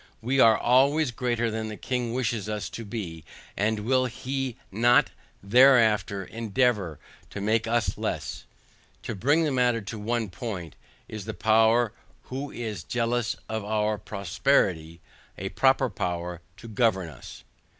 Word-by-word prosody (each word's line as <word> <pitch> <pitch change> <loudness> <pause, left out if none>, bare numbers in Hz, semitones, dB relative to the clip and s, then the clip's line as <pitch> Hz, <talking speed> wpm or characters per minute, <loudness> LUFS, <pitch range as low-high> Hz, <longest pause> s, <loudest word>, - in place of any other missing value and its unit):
We 130 +4 0
are 110 -3 +6
already 135 +3 +3
greater 120 -1 -1
than 110 0 -3
the 105 -1 -6
king 125 -2 -2
wishes 115 -4 -2
us 105 -1 -4
to 115 - -6
be, 100 -8 -6 0.3
and 105 +1 0
will 130 +3 +2
he 130 0 -4
not 120 +5 +4 0.4
hereafter 110 -5 +5
endeavour 110 - 0 0.3
to - - -7
make 110 +3 +1
us 120 0 0
less? - - -4 0.6
To - - -4
bring 145 - +2
the 155 - 0
matter 125 -3 +2
to 110 +1 -7
one 110 -1 -2
point. 90 -3 -6 0.3
Is 110 -3 -7
the - - -5
power 110 +3 +3 0.3
who 135 +3 -5
is 110 -8 -5
jealous 120 +2 -1
of 110 -1 -3
our 105 0 0
prosperity, 90 - 0 0.4
a 95 +1 -4
proper 130 +2 +3
power 90 -4 -4 0.2
to 115 - -11
govern 110 -5 +1
us? 70 -6 -11
110 Hz, 145 wpm, -26 LUFS, 100-125 Hz, 0.6 s, are